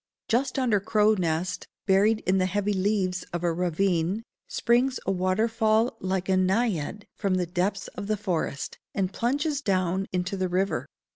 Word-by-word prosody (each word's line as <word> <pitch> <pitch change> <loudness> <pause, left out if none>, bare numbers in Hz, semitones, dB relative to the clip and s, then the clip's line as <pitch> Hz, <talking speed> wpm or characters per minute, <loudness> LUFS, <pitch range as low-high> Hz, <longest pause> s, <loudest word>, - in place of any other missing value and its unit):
Just 250 +5 +1
under 240 -6 +2
Crow 215 +1 +3
Nest, 180 -1 -1 0.2
buried 210 +3 +4
in 190 +1 +2
the 185 - +2
heavy 205 +2 0
leaves 190 -2 0
of 175 0 -3
a 170 -1 +2
ravine, 180 +3 0 0.2
springs 250 +2 +2
a - - +1
waterfall 220 +5 +2
like 185 0 -2
a 190 - +3
Naiad 190 -1 0
from 195 -3 0
the 180 -1 +1
depths 185 +3 -1
of 200 - -7
the 215 0 0
forest, 175 -8 -3 0.2
and 190 -1 0
plunges 285 +4 0
down 190 -3 0
into 180 +2 -1
the 185 -1 -1
river. 190 +2 0
195 Hz, 160 wpm, -27 LUFS, 185-215 Hz, 0.2 s, buried